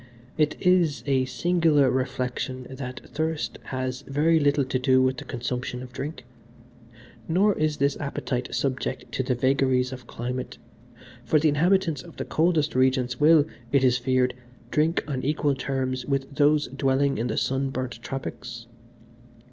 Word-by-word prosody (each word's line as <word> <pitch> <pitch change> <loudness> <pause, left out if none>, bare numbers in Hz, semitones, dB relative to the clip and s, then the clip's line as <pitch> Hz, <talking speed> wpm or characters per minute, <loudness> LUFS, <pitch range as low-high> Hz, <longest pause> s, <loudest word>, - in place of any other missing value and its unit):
"It 155 -1 +1
is 170 -9 +3
a 135 -2 +2
singular 155 -1 +2
reflection 130 0 -2
that 130 -1 -6
thirst 160 0 -3
has 130 0 -3
very 155 +4 +3
little 145 -1 +2
to 130 0 -1
do 130 0 +4
with 130 0 +2
the - - -7
consumption 125 0 -4
of 125 0 -11
drink, 135 -1 -6 1.0
nor 195 +5 +3
is 155 -1 0
this 140 0 +1
appetite 130 -3 -3
subject 135 -2 -2
to - - -1
the 130 0 0
vagaries 130 0 +2
of 125 -2 -10
climate, 125 +2 -5 0.7
for 155 - +3
the 155 +1 +3
inhabitants 165 0 +2
of 170 - -14
the - - -3
coldest 160 -2 +1
regions 130 -1 +1
will, 155 0 +6 0.3
it 140 -2 +3
is 125 -1 +4
feared, 125 0 +1 0.4
drink 155 +3 +2
on 135 -4 -2
equal 145 +1 +1
terms 130 -1 -2
with 135 0 -1
those 150 +1 +3
dwelling 135 +1 +1
in 120 - 0
the 110 - -2
sun 135 +1 0
burnt 130 -3 -5
tropics. 120 -2 -6
135 Hz, 155 wpm, -25 LUFS, 130-150 Hz, 1.0 s, will